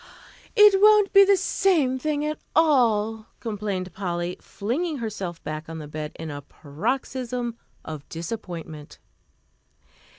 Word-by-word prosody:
"It 415 -2 +7
won't 420 -1 +6
be 395 0 +9
the 395 0 +4
same 325 -8 +2
thing 295 +1 -1
at 305 0 -3 0.2
all," 225 -8 +3
complained 200 -5 -4
Polly, 175 -2 -3
flinging 290 - -3
herself 195 -7 -5
back 155 +1 -5
on 165 - -6
the 155 -2 -7
bed 150 0 -5
in 160 -1 -6
a 145 0 -6
paroxysm 240 - -3 0.3
of 155 -3 -8
disappointment. 165 -4 -7
220 Hz, 125 wpm, -25 LUFS, -, 0.3 s, be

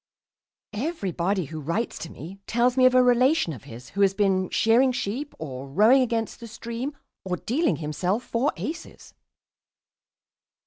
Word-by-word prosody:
Everybody 200 - -1
who 155 +2 -7
writes 170 +11 -2
to 165 - -7
me 180 +7 -10
tells 240 +2 +2
me 255 -1 +6
of 255 - +2
a 255 - +7
relation 250 - +3
of 125 - -11
his 120 +2 -11
who 200 - -2
has 195 -1 +4
been 190 -2 +1
shearing 240 +4 +4
sheep 250 +5 -4
or 135 -3 -7
rowing 215 - +5
against 230 -2 -1
the 235 - -8
stream 235 +5 -6 0.3
or 185 -1 -2
dealing 310 - 0
himself 180 - -2
four 240 +6 0
aces. 320 +3 -7
225 Hz, 150 wpm, -25 LUFS, 180-250 Hz, 0.3 s, a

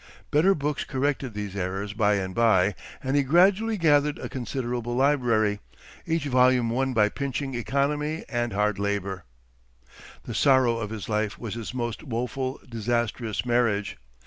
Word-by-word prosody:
Better 180 +7 +4
books 145 0 -2
corrected 135 -3 -2
these 105 -2 -5
errors 95 +2 -3
by 105 -1 +2
and 95 -2 -3
by, 105 -4 +3 0.3
and 135 +1 0
he 145 - +5
gradually 190 - +3
gathered 150 -3 +3
a - - -6
considerable 120 -2 -3
library, 120 -6 +2 0.5
each 165 -2 0
volume 125 -3 +3
won 130 +2 0
by 105 -2 +5
pinching 135 +3 -3
economy 140 +6 -1
and 120 -1 -1
hard 105 0 0
labor. 100 -2 -2 1.0
The 120 - -6
sorrow 130 -2 +3
of 105 -2 -4
his 110 -3 -6
life 105 -1 -1
was 115 -4 -6
his 115 -2 -5
most 120 -3 -3
woeful, 130 +1 -3
disastrous 115 -1 -2
marriage. 120 -4 +1
120 Hz, 145 wpm, -26 LUFS, 105-140 Hz, 1.0 s, he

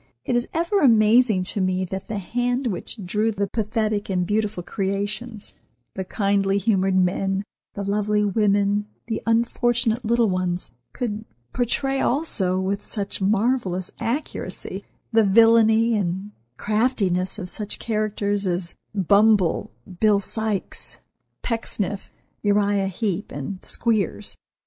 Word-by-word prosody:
It 245 - 0
is 240 0 +1
ever 340 +5 +1
amazing 225 - +5
to 200 - -1
me 185 0 0
that 190 +2 -6
the 215 - -3
hand 245 +6 -1
which 205 -1 -3
drew 210 +5 +1
the 200 -1 -1
pathetic 215 0 -1
and 180 -2 0
beautiful 210 -2 -1
creations, 205 +4 -3 0.4
the 190 - -3
kindly 195 0 +1
humored 195 -2 +2
men, 190 +1 +1 0.3
the 200 - -3
lovely 210 +1 +1
women, 205 0 +2 0.2
the 225 -1 -3
unfortunate 235 +1 +1
little 235 +1 +3
ones, 185 - -1 0.2
could 220 -3 -3 0.3
portray 270 +3 0
also 210 - +1
with 195 +2 -2
such 200 -2 -4
marvellous 200 -3 +1
accuracy 265 +7 -4 0.3
the 225 -1 +5
villainy 225 +2 +5
and 190 +1 -2 0.3
craftiness 210 -5 0
of 190 -4 -5
such 210 +3 -3
characters 205 -2 -1
as 175 -1 -2 0.2
Bumble, 200 -1 +3 0.3
Bill 210 -2 +4
Sykes, 215 0 -1 0.4
Pecksniff, 210 -4 -3 0.3
Uriah 205 -1 +2
Heep 195 0 -3
and 145 +7 -6
Squeers. 215 -2 0
205 Hz, 120 wpm, -23 LUFS, 195-225 Hz, 0.4 s, amazing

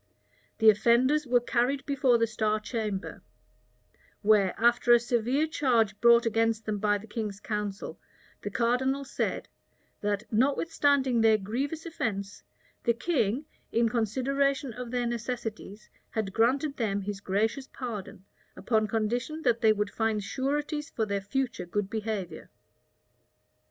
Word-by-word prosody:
The 220 -1 +7
offenders 255 +7 +2
were 245 0 +4
carried 250 +3 0
before 275 -4 +3
the 230 - +2
star 215 -1 0
chamber; 215 -3 -4 1.0
where, 205 -3 +3
after 240 +1 +4
a 240 - +7
severe 240 +5 +1
charge 235 -9 +1
brought 235 0 +6
against 225 0 +1
them 210 -1 -2
by 205 0 +2
the 205 - -11
king's 210 -3 -5
council, 210 -2 -4 0.4
the 205 - -4
cardinal 250 +5 0
said, 270 - -3 0.5
"that 205 0 -1
notwithstanding 270 0 +2
their 220 -1 +5
grievous, 270 - -3
offence, 205 -11 -4 0.4
the 235 - +2
king, 265 - 0 0.3
in, 230 0 +2
consideration 265 +4 0
of 250 +1 -7
their 245 0 -1
necessities, 235 -3 -5 0.2
had 210 -4 -3
granted 275 +6 +1
them 205 -4 -1
his 200 0 -5
gracious 220 +8 -1
pardon, 215 -6 -7 0.3
upon 220 -2 +1
condition 240 +9 -2
that 235 -3 +2
they 220 - +6
would 210 -1 -1
find 220 -2 -1
sureties 295 +6 -2
for 220 - -2
their 200 -1 -2
future 235 -1 -3
good 200 +2 -2
behavior." 215 -4 -4
230 Hz, 135 wpm, -28 LUFS, 210-260 Hz, 1.0 s, The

